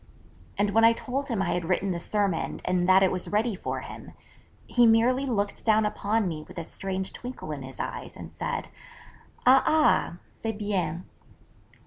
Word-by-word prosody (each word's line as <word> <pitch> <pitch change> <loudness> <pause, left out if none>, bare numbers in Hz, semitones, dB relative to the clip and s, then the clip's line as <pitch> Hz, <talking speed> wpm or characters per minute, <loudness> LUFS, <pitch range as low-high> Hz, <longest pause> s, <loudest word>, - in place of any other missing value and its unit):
_ - - -29 0.5
And 205 0 +1
when 225 +2 +4
I 230 0 +7
told 270 +4 -3
him 225 -7 0
I - - -1
had 175 - -1
written 185 +3 0
the 170 - -2
sermon 200 -2 -1
and 180 0 +1
that 190 +1 +7
it 190 - +3
was 185 -1 -2
ready 220 +2 +1
for 190 - -4
him, - - -10 0.5
he 240 -1 +4
merely 250 +4 +3
looked 205 -5 -1
down 220 -1 +4
upon 210 0 0
me 155 -3 -4
with - - -13
a 170 - -3
strange 190 +2 -4
twinkle 245 -10 -7
in 145 -2 -5
his 130 0 -10
eyes, - - -5
and - - -10
said, - - -4 0.8
'_A 260 +1 +7
ah, 310 - +3
c'est 225 0 -5
bien. 185 -5 -2
205 Hz, 185 wpm, -27 LUFS, 180-230 Hz, 0.8 s, I